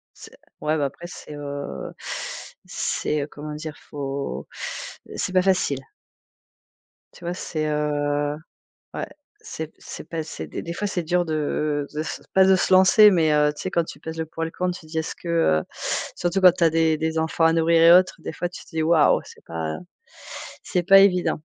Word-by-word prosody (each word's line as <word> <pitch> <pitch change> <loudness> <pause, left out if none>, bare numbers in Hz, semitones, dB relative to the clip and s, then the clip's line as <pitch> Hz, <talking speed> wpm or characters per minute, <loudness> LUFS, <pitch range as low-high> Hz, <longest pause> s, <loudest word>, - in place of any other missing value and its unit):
C'est - - -14 0.2
ouais 155 +1 +1
bah, 145 - +1
après 170 +5 -6
c'est, 150 - -10
heu, 140 - -6 0.7
c'est 150 -1 -2
comment 150 +1 -7
dire, 155 0 -6
il - - -20
faut, 140 - -4 0.6
heu, - - -9
c'est 185 - -2
pas 185 - +5
facile. 180 -8 +1 1.3
Tu - - -16
vois, 175 - -1
c'est, 155 -3 -3
heu, 145 -1 0 0.6
ouais, - - -3 0.4
c'est 160 - -6
p - - -29
c'est - - -8
pas 165 -2 -3
c'est 80 - -7
des - - -5
des 170 - -5
fois 205 +4 -2
c'est 175 -3 -2
dur 175 +2 +1
de 150 -1 -1
de 150 - -4
s - - -5
pas 190 0 +6
de 190 0 +6
se 185 - +1
lancer, 200 +3 +7
mais, 160 -4 +3
heu, 150 0 +4
tu - - -8
sais 185 - -3
quand 170 - +2
tu 145 - -10
pèses 160 +1 -7
le 160 - -2
pour 165 +1 -5
et - - 0
le - - -8
contre, 180 0 -2
tu 160 - -15
te 155 - -16
dis: 160 - -4
«Est-ce 160 - -4
que, 175 - -11
heu» 80 - +3 0.5
surtout 180 +2 0
quand 180 -1 +9
tu 175 -1 -1
as 165 - +6
des 160 -1 +2
des 160 +1 -1
enfants 160 +1 +1
à 165 - +5
nourrir 165 0 +4
et 165 +1 +8
autres, 185 - -3
des - - -6
fois 175 +1 -3
tu - - -10
te - - -20
dis: 160 -1 -2
«Waouh, 160 -2 +4
c'est - - -15
pas 80 -1 -4 0.9
c'est 180 -2 -1
pas 195 +2 +8
évident». 180 -5 +3
160 Hz, 215 wpm, -24 LUFS, 150-175 Hz, 1.3 s, quand